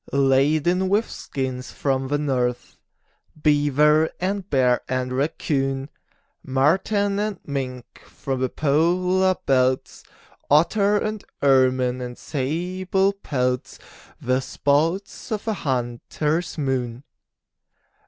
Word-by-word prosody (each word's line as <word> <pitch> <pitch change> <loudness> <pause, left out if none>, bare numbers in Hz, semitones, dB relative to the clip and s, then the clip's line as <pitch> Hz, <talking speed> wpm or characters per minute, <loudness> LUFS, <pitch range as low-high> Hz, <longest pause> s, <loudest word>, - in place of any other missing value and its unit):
Laden 150 +7 +2
with 210 +4 +2
skins 130 -2 -5
from 135 -1 -1
the 145 +2 0
north, 125 -4 -1 0.6
Beaver 150 +1 +3
and 195 +1 -2
bear 125 -3 +3
and 130 0 -1
raccoon, 135 0 -1 0.5
Marten 195 +9 +1
and 210 -2 -2
mink 130 -3 -5
from 135 -2 -4
the 130 - +1
polar 180 +6 +2
belts, 130 -1 +1 0.5
Otter 200 +8 +4
and 215 0 -3 0.2
ermine 130 -2 +3
and 125 -1 -6
sable 180 +7 -1
pelts 125 -10 -2 0.4
The 130 +1 +1
spoils 160 +12 -1
of 210 -2 -2
the 220 - 0
hunter's 145 - -2
moon. 130 -4 -2
145 Hz, 100 wpm, -23 LUFS, 130-180 Hz, 0.6 s, Otter